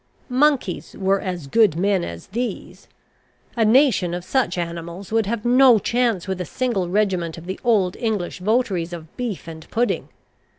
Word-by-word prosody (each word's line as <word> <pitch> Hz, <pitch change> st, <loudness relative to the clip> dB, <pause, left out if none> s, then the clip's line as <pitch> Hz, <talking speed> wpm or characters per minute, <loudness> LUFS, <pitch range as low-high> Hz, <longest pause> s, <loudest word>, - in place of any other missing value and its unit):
Monkeys 260 Hz, -, +1 dB
were 195 Hz, 0 st, +1 dB
as 180 Hz, -5 st, -4 dB
good 200 Hz, +4 st, +3 dB
men 190 Hz, +1 st, +1 dB
as 85 Hz, 0 st, -7 dB
these. 240 Hz, +4 st, -5 dB, 0.7 s
A 230 Hz, -, +2 dB
nation 220 Hz, -7 st, +4 dB
of 175 Hz, -, -5 dB
such 245 Hz, -8 st, 0 dB
animals 170 Hz, +2 st, -5 dB
would 225 Hz, -2 st, +1 dB
have 230 Hz, 0 st, -3 dB
no 250 Hz, 0 st, +6 dB
chance 230 Hz, -3 st, 0 dB
with 190 Hz, -1 st, -3 dB
a -, -, -1 dB
single 225 Hz, -8 st, -1 dB
regiment 185 Hz, -5 st, 0 dB
of 165 Hz, -, -10 dB
the 190 Hz, +1 st, -5 dB
old 205 Hz, -7 st, +2 dB
English 210 Hz, -7 st, -2 dB
votaries 190 Hz, -4 st, 0 dB
of 160 Hz, -2 st, -9 dB
beef 235 Hz, -8 st, -4 dB
and 160 Hz, -1 st, -10 dB
pudding. 240 Hz, +2 st, -1 dB
195 Hz, 165 wpm, -22 LUFS, 175-235 Hz, 0.7 s, no